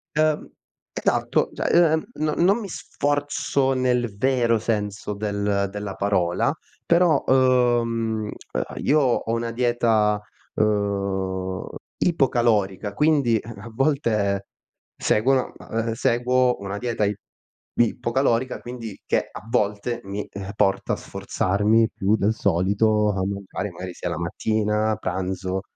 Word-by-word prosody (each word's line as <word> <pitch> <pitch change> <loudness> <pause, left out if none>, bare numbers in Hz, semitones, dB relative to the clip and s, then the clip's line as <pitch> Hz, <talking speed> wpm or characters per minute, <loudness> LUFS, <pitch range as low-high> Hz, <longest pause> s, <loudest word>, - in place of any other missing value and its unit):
Uhm, 155 0 +1 0.4
esatto. - - +1
Cioè, - - -2 0.2
ehm, 160 - +1
no 155 0 0
non 195 +6 +4
mi 205 - -5
sforzo 145 -4 -1
nel 125 -4 0
vero 120 -2 +2
senso 105 -2 -2
del 100 -1 -1
della 100 -1 -5
parola, 90 -4 +1 0.3
però, 170 -4 +4
uhm, 120 -4 +2 0.5
io 150 +2 +3
ho 125 -4 +1
una 115 0 -1
dieta, 115 -3 +2 0.4
uhm, 100 -3 -1 0.3
ipocalorica, 115 - +1
quindi 140 -3 +3
a 115 - -9
a 115 - -7
volte 110 -7 0 0.5
seguo 130 +4 +2 0.4
seguo 125 +2 +2
una 100 0 -4
dieta 120 -3 -1
ip 100 0 -1 0.6
ipocalorica, 120 +1 +1
quindi 120 -4 -8
che - - 0
a - - -8
volte 105 +4 0
mi 100 +1 -4 0.3
porta 95 -1 +1
a - - +1
sforzarmi 105 +4 +1
più 100 +3 +2
del 105 0 +1
solito, 105 +2 +2
a 95 -2 -2
mangiare 100 0 -4
magari 90 +1 -7
sia - - -4
la - - -3
mattina, 105 +5 0
pranzo 95 0 -3
110 Hz, 115 wpm, -23 LUFS, 100-125 Hz, 0.6 s, non